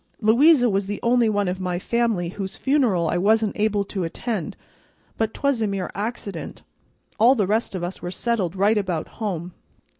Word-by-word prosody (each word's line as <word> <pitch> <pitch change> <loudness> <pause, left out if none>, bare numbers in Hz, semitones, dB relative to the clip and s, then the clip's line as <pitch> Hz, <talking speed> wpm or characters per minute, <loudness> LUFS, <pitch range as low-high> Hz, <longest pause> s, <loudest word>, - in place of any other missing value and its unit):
Louisa 245 +5 +5
was 195 -2 0
the 205 0 -4
only 235 -1 +3
one 205 -2 0
of 180 +1 -2
my 180 -1 -2
family 220 -3 0
whose 195 +1 -6
funeral 245 - +2
I 175 - 0
wasn't 215 +2 +2
able 210 -1 +1
to 195 -1 -4
attend, 185 +2 -4 0.6
but 220 -1 -1
'twas 280 -3 0
a 215 - +1
mere 195 -2 -3
accident. 205 -4 -5 0.6
All 240 +5 +6
the 210 -6 +1
rest 215 +1 0
of 180 - -4
us 175 +2 -5
were 175 - -4
settled 195 -3 -1
right 205 +3 +3
about 180 -5 -2
home. 180 -5 -4
205 Hz, 180 wpm, -23 LUFS, 185-230 Hz, 0.6 s, All